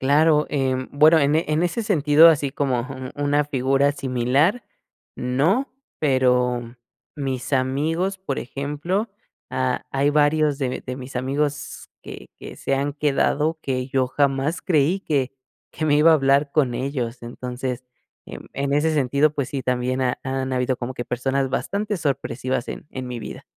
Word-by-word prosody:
Claro, 150 +3 +4
em, 130 -2 -1
bueno 155 +3 +6
en 145 +1 +2
en 155 0 0
ese 175 +6 -1
sentido 160 -5 +6
así 145 -3 +2
como 130 -3 0
un 130 -1 -7
una 145 0 +1
figura 135 0 +1
similar 140 - +1 0.5
no, 150 - +1 0.3
pero 125 -3 +1 0.4
mis 135 -2 -4
amigos, 155 +9 0
por 145 -8 -4
ejemplo, 150 - -3 0.4
ha 130 -1 -1
hay 140 +2 +2
varios 150 0 +2
de 130 -2 -2
de 130 0 -5
mis 130 0 -8
amigos 140 +3 -2
que - - -9
que - - -10
se 135 - -1
han 140 +1 -1
quedado, 150 +2 +1
que 130 -1 -2
yo 130 -1 +1
jamás 140 +4 0
creí 170 +2 +2
que 140 -8 -1 0.4
que 155 - -4
me 145 -1 +4
iba 160 +2 +6
a - - +7
hablar 140 0 +2
con 135 -6 +2
ellos. 125 -3 -3
Entonces, 125 +1 -5 0.4
em, - - -9
en 140 +1 -2
ese 155 +2 +2
sentido, 145 +1 +2
pues 140 -3 -2
sí, 135 -2 -4
también 125 +1 -1
ha 125 -1 0
han 130 0 -2
habido 125 0 0
como 125 +1 -5
que 120 - -4
personas 135 +2 -1
bastante 200 - -2
sorpresivas 130 -4 -2
en - - -7
en 130 -1 -6
mi 120 -2 -5
vida. 105 - -8
140 Hz, 160 wpm, -23 LUFS, 130-150 Hz, 0.5 s, a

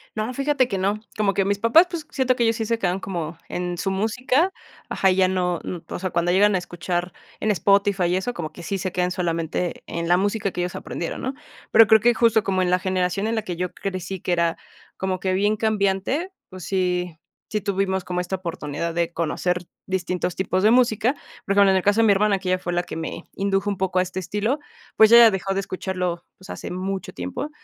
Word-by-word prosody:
No, 215 +3 -2
fíjate 275 -1 +1
que 195 - -2
no, 200 +3 0 0.2
como 205 -2 +2
que 195 - +2
mis 200 0 0
papás, 270 - +6
pues, 335 -4 -5
siento 260 -2 +1
que 240 - +1
ellos 225 0 +2
sí 225 -1 -2
se 230 +1 -1
quedan 185 -2 0
como 170 -4 -5
en 180 0 -3
su 195 - -1
música, 250 - +1 0.4
ajá, 190 -1 +2
y 185 - 0
ya 190 -1 +5
no, 180 -2 0
mm, 180 - -4
o - - -5
sea, 185 - -2
cuando 175 0 +1
llegan 200 +2 +4
a - - +3
escuchar 175 0 -3 0.3
en 215 - +1
Spotify 200 0 +2
y 175 +1 +1
eso, 190 +7 -2
como 155 -7 -5
que 170 - -11
sí 195 +3 -2
se 185 0 -3
quedan 180 0 0
solamente 170 -1 -2
en 170 0 -4
la 175 +1 +4
música 200 +1 0
que 180 - -3
ellos 180 0 -3
aprendieron, 170 - -5
¿no?, 260 - -2 0.4
pero 225 0 +8
creo 220 -1 +6
que 240 +3 +4
justo 225 -2 +3
como 190 -1 0
en 180 - 0
la 180 - +3
generación 185 +2 -1
en 230 - -1
la 220 - -1
que 180 -4 -4
yo 180 +1 -3
crecí 190 -1 -5
que 180 - -3
era 170 -1 +1 0.4
como 190 -1 -2
que 185 0 -1
bien 205 +3 +2
cambiante, 215 - 0 0.2
pues, 185 -2 -9
sí, 180 -3 -1 0.4
sí 210 -1 -1
tuvimos 190 -1 -1
como 180 0 -3
esta 185 +2 -3
oportunidad 165 -2 -4
de 170 0 0
conocer 180 +2 -1 0.2
distintos 180 -1 -2
tipos 185 0 0
de 215 - +5
música. 235 0 +3 0.3
Pues 200 - +1
bueno, 200 -1 +6
en 190 - +3
el - - +1
caso 205 +4 +3
de - - +4
mi 210 - +5
hermana, 200 0 +3
que 185 -1 -5
ella 185 - +2
fue 175 -1 -3
la 175 - +1
que - - -8
me 160 0 -5
indujo 195 +1 0
un 200 - -4
poco 185 0 -1
a 185 - +4
este 185 +1 -5
estilo, 210 - -1 0.4
pues 220 +1 +7
ella 235 -1 +9
dejó 195 0 -2
de - - +1
escucharlo, 185 -2 -3
pues, 185 - -15
hace - - -6
mucho 190 +1 -4
tiempo, 90 - -5
190 Hz, 235 wpm, -23 LUFS, 180-210 Hz, 0.4 s, ella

